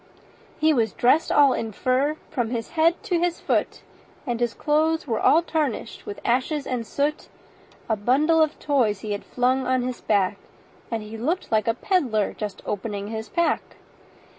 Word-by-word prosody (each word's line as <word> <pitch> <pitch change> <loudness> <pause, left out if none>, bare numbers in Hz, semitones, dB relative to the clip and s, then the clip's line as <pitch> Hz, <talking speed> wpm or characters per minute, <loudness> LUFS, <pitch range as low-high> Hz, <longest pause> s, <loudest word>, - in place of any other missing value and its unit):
He 315 0 +4
was 225 -6 +1
dressed 280 +7 +3
all 280 -3 +6
in 225 -2 -3
fur 265 +7 +1
from 245 -6 -1
his 230 -2 -3
head 330 +1 +3
to 350 -2 0
his 345 0 0
foot, - - -1 0.4
And 240 -4 -2
his 240 -1 -1
clothes 315 +2 +1
were 230 -5 -1
all 330 +3 +4
tarnished 305 -8 -3
with 205 - -6
ashes 260 +4 0
and 240 -3 -3
soot; 290 +2 -1 0.6
A 220 - +1
bundle 285 +10 +3
of 310 -1 +1
toys 235 -9 +1
he 215 - -5
had 205 - -3
flung 255 +1 0
on 255 -1 +1
his 250 -1 -4
back, 200 -1 +1 0.5
And 225 -2 -3
he 215 +1 -8
looked 325 +10 -2
like 215 -1 +2
a 225 - +2
pedler 250 - 0
just 210 -2 -6
opening 205 0 -4
his 220 0 -5
pack. 340 -2 +1
255 Hz, 175 wpm, -24 LUFS, 220-305 Hz, 0.6 s, all